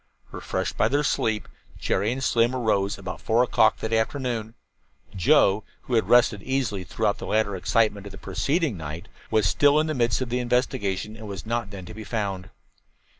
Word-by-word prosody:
Refreshed -, -, -3 dB
by -, -, +3 dB
their 145 Hz, +5 st, +1 dB
sleep, 110 Hz, -6 st, 0 dB, 0.3 s
Jerry 100 Hz, +4 st, 0 dB
and 130 Hz, +2 st, -3 dB
Slim 120 Hz, +1 st, +2 dB
arose 100 Hz, -5 st, 0 dB
about 90 Hz, -3 st, -7 dB
four 115 Hz, +2 st, +3 dB
o'clock 110 Hz, -3 st, +3 dB
that 110 Hz, 0 st, -2 dB
afternoon. 115 Hz, -1 st, -1 dB, 0.6 s
Joe, 95 Hz, +3 st, +4 dB, 0.2 s
who 125 Hz, -, -6 dB
had 115 Hz, -, +2 dB
rested 120 Hz, -4 st, +4 dB
easily 125 Hz, -7 st, -1 dB
throughout 105 Hz, +2 st, -1 dB
the -, -, -6 dB
later 105 Hz, -2 st, +1 dB
excitement 105 Hz, +1 st, +1 dB
of -, -, -9 dB
the 95 Hz, -, -11 dB
preceding 150 Hz, -, -1 dB
night, 80 Hz, +1 st, -7 dB, 0.2 s
was 110 Hz, -2 st, +2 dB
still 145 Hz, +7 st, +4 dB
in 155 Hz, -, +2 dB
the 155 Hz, -, -1 dB
midst 120 Hz, -6 st, +1 dB
of 130 Hz, -2 st, -3 dB
the 125 Hz, +1 st, 0 dB
investigation 110 Hz, -5 st, -1 dB
and 110 Hz, -1 st, -9 dB
was 100 Hz, 0 st, -7 dB
not 115 Hz, -2 st, -2 dB
then 95 Hz, -3 st, -8 dB
to 100 Hz, -, -9 dB
be 110 Hz, 0 st, -8 dB
found. 100 Hz, -4 st, -3 dB
110 Hz, 185 wpm, -25 LUFS, 100-125 Hz, 0.6 s, Joe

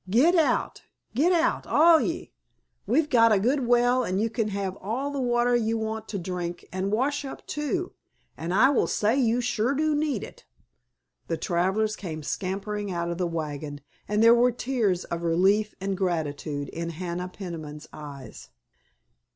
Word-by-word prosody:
Git 260 Hz, -, +5 dB
out, 325 Hz, -4 st, +1 dB, 0.3 s
git 300 Hz, +10 st, +3 dB
out, 340 Hz, -2 st, +1 dB
all 330 Hz, +1 st, +6 dB
of -, -, 0 dB
ye! -, -, -4 dB, 0.6 s
We've 315 Hz, -1 st, +2 dB
got 230 Hz, -5 st, +5 dB
a 210 Hz, -, +5 dB
good 250 Hz, +4 st, +1 dB
well 245 Hz, +1 st, +3 dB
and 190 Hz, -3 st, -1 dB
you 225 Hz, +1 st, 0 dB
can 225 Hz, -1 st, -1 dB
have 195 Hz, -2 st, -3 dB
all 250 Hz, +8 st, -3 dB
the 280 Hz, -1 st, -2 dB
water 240 Hz, 0 st, +2 dB
ye 225 Hz, -1 st, +1 dB
want 220 Hz, 0 st, -3 dB
to 205 Hz, -, -4 dB
drink 175 Hz, -1 st, -5 dB
and 190 Hz, +1 st, -2 dB
wash 275 Hz, +7 st, 0 dB
up, 270 Hz, -, -8 dB
too, 345 Hz, +5 st, -2 dB, 0.4 s
and 165 Hz, +2 st, -4 dB
I 225 Hz, +9 st, +5 dB
will 275 Hz, -, +2 dB
say 215 Hz, +3 st, +1 dB
you 245 Hz, -2 st, +2 dB
sure 245 Hz, +2 st, 0 dB
do 310 Hz, +2 st, +1 dB
need 295 Hz, -1 st, 0 dB
it." -, -, -11 dB, 0.8 s
The 165 Hz, -, -1 dB
travelers 190 Hz, +6 st, 0 dB
came 160 Hz, -5 st, -6 dB
scrambling 200 Hz, +4 st, -3 dB
out 170 Hz, -1 st, -2 dB
of 170 Hz, -, -5 dB
the 180 Hz, -, +1 dB
wagon, 150 Hz, -3 st, -4 dB, 0.3 s
and 210 Hz, +1 st, +2 dB
there 230 Hz, +1 st, +8 dB
were 245 Hz, +1 st, +4 dB
tears 230 Hz, -7 st, 0 dB
of 170 Hz, 0 st, -4 dB
relief 190 Hz, +6 st, +2 dB
and 195 Hz, 0 st, -2 dB
gratitude 155 Hz, -5 st, -2 dB
in 170 Hz, +1 st, -4 dB
Hannah 175 Hz, +2 st, -4 dB
Peniman's 160 Hz, -6 st, -8 dB
eyes. 140 Hz, -3 st, -10 dB
210 Hz, 175 wpm, -26 LUFS, 175-245 Hz, 0.8 s, there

